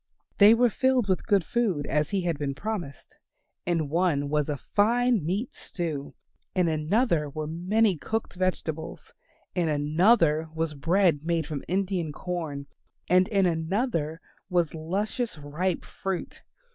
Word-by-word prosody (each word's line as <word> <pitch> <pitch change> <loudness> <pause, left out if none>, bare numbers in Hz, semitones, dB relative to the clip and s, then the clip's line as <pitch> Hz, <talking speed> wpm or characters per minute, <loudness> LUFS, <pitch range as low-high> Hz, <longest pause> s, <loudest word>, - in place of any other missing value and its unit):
They 210 +2 +8
were 240 0 +3
filled 260 -3 +2
with 185 -2 0
good 200 -3 +3
food 195 -11 0
as 150 -1 0
he 200 -2 0
had 170 -4 -1
been 140 -2 -2
promised. 180 - -6 0.5
In 165 -4 +1
one 150 -3 +1
was 150 0 0
a 145 - -1
fine 235 - +2
meat 195 - -2
stew; 155 -6 -5 0.4
in 180 -2 +3
another 160 - +1
were 155 +2 -4
many 185 +5 +1
cooked 220 +8 -3
vegetables; 175 -3 -3 0.4
in 175 -4 0
another 155 +2 +3
was 160 -1 -1
bread 165 +2 +2
made 165 -1 0
from 150 -3 -5
Indian 185 -3 -1
corn; 155 -4 -4 0.4
and 185 +1 +5
in 200 -4 +2
another 165 - -1 0.3
was 175 -4 +1
luscious 195 +7 -2
ripe 155 +5 -2
fruit. 190 -2 -5
175 Hz, 140 wpm, -27 LUFS, 155-200 Hz, 0.5 s, They